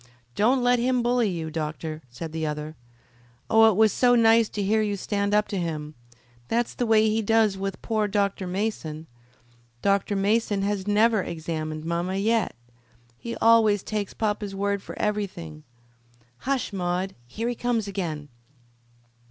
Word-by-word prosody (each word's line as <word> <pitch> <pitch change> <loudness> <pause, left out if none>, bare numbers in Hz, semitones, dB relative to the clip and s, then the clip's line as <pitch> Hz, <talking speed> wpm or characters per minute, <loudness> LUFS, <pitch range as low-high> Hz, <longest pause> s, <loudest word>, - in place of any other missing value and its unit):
"Don't 245 - +2
let 245 0 +3
him 250 0 +1
bully 240 -2 +2
you, 165 -3 -4
doctor," 155 0 -4
said 155 +7 -7
the 160 0 -4
other. 150 0 -4 0.8
"Oh, 225 0 +7
it 215 - +1
was 220 +1 +4
so 245 -1 +4
nice 225 -1 +5
to 205 - -3
hear 215 +3 +2
you 205 -1 -1
stand 200 +1 -1
up 210 0 +3
to 200 - -2
him. 155 -3 -4 0.5
That's 235 +1 0
the 245 - -2
way 220 -1 +5
he 220 +1 +1
does 220 -1 +3
with 195 -1 -4
poor 215 -2 0
Dr. 200 -2 -1
Mason. 180 -5 -3 0.8
Dr. 200 0 +1
Mason 205 0 +1
has 200 -1 -2
never 215 +1 +3
examined 155 -2 -4
mamma 170 +3 -1
yet. 215 - +1 0.6
He 235 - -5
always 220 -3 +4
takes 210 -2 -3
papa's 210 -2 -2
word 200 0 -1
for - - -9
everything. 195 - -3 0.8
Hush, 265 -5 -2
Maude; 185 0 -2
here 225 - -4
he 245 - 0
comes 235 -3 -1
again." 160 -7 -4
205 Hz, 155 wpm, -25 LUFS, 175-225 Hz, 0.8 s, Oh